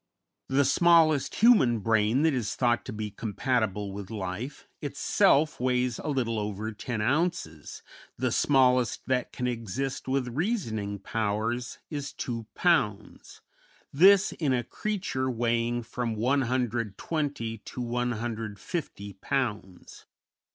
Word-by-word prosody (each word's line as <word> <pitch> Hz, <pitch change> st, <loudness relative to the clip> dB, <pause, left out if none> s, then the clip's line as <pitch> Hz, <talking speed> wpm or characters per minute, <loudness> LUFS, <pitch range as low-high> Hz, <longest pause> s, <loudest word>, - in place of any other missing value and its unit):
The 135 Hz, +1 st, +3 dB
smallest 160 Hz, 0 st, +4 dB
human 210 Hz, -, +5 dB
brain 110 Hz, +5 st, +2 dB
that 160 Hz, -2 st, +3 dB
is 120 Hz, -5 st, -2 dB
thought 120 Hz, -2 st, +1 dB
to -, -, -5 dB
be 105 Hz, -1 st, -5 dB
compatible 105 Hz, -2 st, -1 dB
with 100 Hz, -1 st, -7 dB
life 105 Hz, +5 st, -5 dB
itself 150 Hz, +2 st, +2 dB
weighs 125 Hz, -1 st, 0 dB
a -, -, -6 dB
little 120 Hz, -6 st, 0 dB
over 105 Hz, +1 st, -3 dB
ten 110 Hz, +1 st, -4 dB
ounces, 135 Hz, -, -1 dB, 0.3 s
the -, -, 0 dB
smallest 125 Hz, -3 st, +3 dB
that 130 Hz, -1 st, 0 dB
can 125 Hz, -, -4 dB
exist 125 Hz, +3 st, -3 dB
with 130 Hz, -1 st, 0 dB
reasoning 115 Hz, -, -2 dB
powers 110 Hz, +4 st, -2 dB
is 145 Hz, -2 st, -4 dB
two 115 Hz, -3 st, -5 dB
pounds; 105 Hz, -, 0 dB, 0.5 s
this 190 Hz, +6 st, +6 dB
in 145 Hz, -5 st, 0 dB
a 120 Hz, -1 st, 0 dB
creature 180 Hz, -, -2 dB
weighing 120 Hz, 0 st, 0 dB
from 115 Hz, 0 st, -3 dB
120 120 Hz, +1 st, -1 dB
to 115 Hz, -, -9 dB
150 115 Hz, -, -3 dB
pounds. 105 Hz, -8 st, -3 dB
120 Hz, 115 wpm, -28 LUFS, 110-135 Hz, 0.5 s, this